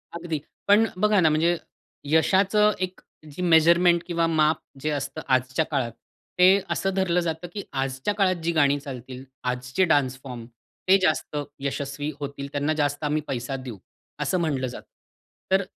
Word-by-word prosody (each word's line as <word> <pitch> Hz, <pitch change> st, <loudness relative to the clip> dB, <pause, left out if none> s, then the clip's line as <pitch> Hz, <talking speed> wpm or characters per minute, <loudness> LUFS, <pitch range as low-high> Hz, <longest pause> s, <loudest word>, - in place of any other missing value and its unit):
अगदी. 165 Hz, -2 st, -3 dB, 0.3 s
पण 205 Hz, +2 st, +6 dB, 0.2 s
बघा 210 Hz, -1 st, +4 dB
ना 165 Hz, -3 st, +5 dB
म्हणजे 165 Hz, +3 st, +2 dB, 0.5 s
यशाचं 195 Hz, +6 st, +4 dB
एक 185 Hz, 0 st, -15 dB, 0.3 s
जी 165 Hz, -, -6 dB
मेजरमेंट 170 Hz, +1 st, +5 dB
किंवा 170 Hz, -1 st, +1 dB
माप 155 Hz, -1 st, +2 dB, 0.2 s
जे 155 Hz, -, -1 dB
असतं 145 Hz, -2 st, -3 dB
आजच्या 130 Hz, +3 st, +1 dB
काळात 130 Hz, -5 st, 0 dB, 0.5 s
ते 190 Hz, +2 st, +6 dB
असं 195 Hz, -, -1 dB
धरलं 185 Hz, -2 st, +1 dB
जातं 165 Hz, +1 st, -3 dB
कि 200 Hz, -, -5 dB
आजच्या 135 Hz, +7 st, -2 dB
काळात 190 Hz, -2 st, +2 dB
जी 170 Hz, -, +1 dB
गाणी 145 Hz, -3 st, +3 dB
चालतील, 130 Hz, -2 st, -8 dB, 0.2 s
आजचे 125 Hz, +6 st, -1 dB
डान्स 135 Hz, -5 st, +1 dB
फॉर्म 125 Hz, -4 st, -7 dB, 0.4 s
ते 190 Hz, +1 st, +7 dB
जास्त 155 Hz, -3 st, 0 dB, 0.2 s
यशस्वी 140 Hz, +1 st, -3 dB
होतील. 140 Hz, -1 st, -5 dB
त्यांना 145 Hz, +2 st, 0 dB
जास्त 145 Hz, -1 st, -1 dB
आम्ही 150 Hz, +1 st, 0 dB
पैसा 125 Hz, +1 st, -3 dB
देऊ 130 Hz, -5 st, -7 dB, 0.4 s
असं 185 Hz, -, 0 dB
म्हटलं 140 Hz, -6 st, -1 dB
जातं. 125 Hz, -, -9 dB, 0.6 s
तर 190 Hz, +1 st, +4 dB
155 Hz, 155 wpm, -25 LUFS, 135-175 Hz, 0.6 s, ते